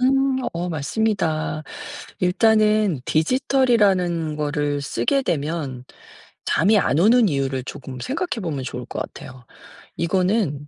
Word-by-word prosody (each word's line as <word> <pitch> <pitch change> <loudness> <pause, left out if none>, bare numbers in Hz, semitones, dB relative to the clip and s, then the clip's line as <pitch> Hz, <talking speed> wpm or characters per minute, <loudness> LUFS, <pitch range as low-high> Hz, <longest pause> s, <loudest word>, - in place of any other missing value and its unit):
음 270 +2 +3 0.3
어 175 +1 -3
맞습니다. 160 -2 -1 0.6
일단은 215 - +3
디지털이라는 190 - +2
거를 145 -1 -1
쓰게 275 - 0
되면 145 - -3 0.6
잠이 205 +6 +3
안 150 - +1
오는 225 +3 +5
이유를 135 -3 -1
조금 130 -2 -8
생각해 275 - -3
보면 145 -6 -3
좋을 - - -6
것 - - -5
같아요. 130 -1 -9 0.5
이거는 180 -4 0
170 Hz, 255 characters per minute, -22 LUFS, 145-220 Hz, 0.6 s, 오는